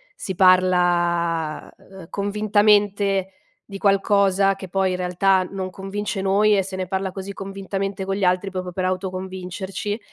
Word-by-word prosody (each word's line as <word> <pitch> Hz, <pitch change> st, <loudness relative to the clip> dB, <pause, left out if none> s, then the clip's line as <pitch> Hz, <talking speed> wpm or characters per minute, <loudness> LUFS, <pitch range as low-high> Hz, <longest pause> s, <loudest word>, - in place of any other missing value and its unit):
si 190 Hz, -, -5 dB
parla, 175 Hz, -3 st, +2 dB
uhm, 190 Hz, -3 st, -14 dB
convintamente 205 Hz, -1 st, +2 dB, 0.3 s
di 195 Hz, -, -8 dB
qualcosa 195 Hz, -1 st, +3 dB
che 190 Hz, -1 st, -9 dB
poi, 190 Hz, +1 st, +1 dB
in 180 Hz, -, -2 dB
realtà, 185 Hz, +1 st, +2 dB
non 190 Hz, -1 st, -5 dB
convince 195 Hz, +1 st, -4 dB
noi 205 Hz, +2 st, +3 dB
e 195 Hz, -, +3 dB
se 190 Hz, 0 st, -7 dB
ne 185 Hz, -1 st, -3 dB
parla 190 Hz, 0 st, -2 dB
così 195 Hz, +1 st, -7 dB
convintamente 195 Hz, 0 st, -4 dB
con 195 Hz, -, -2 dB
gli 195 Hz, -, -3 dB
altri 185 Hz, +2 st, +1 dB
proprio 185 Hz, -1 st, -4 dB
per 185 Hz, +1 st, -2 dB
autoconvincerci, 190 Hz, +2 st, -4 dB
190 Hz, 150 wpm, -22 LUFS, 185-200 Hz, 0.3 s, qualcosa